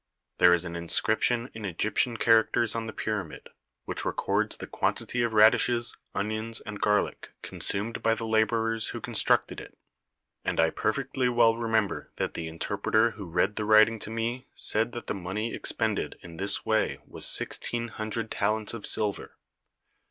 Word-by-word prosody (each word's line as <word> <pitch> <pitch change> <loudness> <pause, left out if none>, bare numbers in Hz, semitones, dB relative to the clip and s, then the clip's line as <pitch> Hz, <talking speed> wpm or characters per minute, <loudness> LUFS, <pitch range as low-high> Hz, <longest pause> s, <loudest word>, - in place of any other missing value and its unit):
There 90 0 +7
is 85 +1 -3
an 85 -1 -6
in 85 0 -6
scription 115 +2 +1
in 110 - -8
Egyptian 110 +5 -1
characters 115 0 +3
on 115 -1 -3
the - - -4
pyramid, 105 -8 -4 0.4
which - - -3
records - - -1
the - - -7
quantity 125 - -1
of 120 -1 0
radishes, 120 +2 +4 0.2
onions, 110 +2 -2
and 105 -2 -8
garlic 105 0 0
consumed 105 +3 -1
by 115 0 +2
the 115 - -5
labourers 110 0 +1
who - - -5
constructed - - +1
it; - - -12 0.7
and - - -2
I 80 0 +4
perfectly 130 +3 -1
well 120 -2 +4
remember 110 -3 -1
that - - -2
the 80 - -5
interpreter 100 +7 0
who 100 -2 -9
read 90 +4 0
the 105 - -1
writing 110 +1 +5
to 105 - -5
me 115 +3 -3
said 115 +2 +2
that 120 - -6
the - - -2
money 100 +4 -4
ex - - 0
pended 110 -3 -1
in 85 -2 -11
this 100 +2 0
way 110 0 +1
was - - -5
sixteen 120 0 0
hundred 110 0 -4
talents 110 0 0
of 115 -3 -2
silver. 105 -2 -1
110 Hz, 165 wpm, -27 LUFS, 105-115 Hz, 0.7 s, There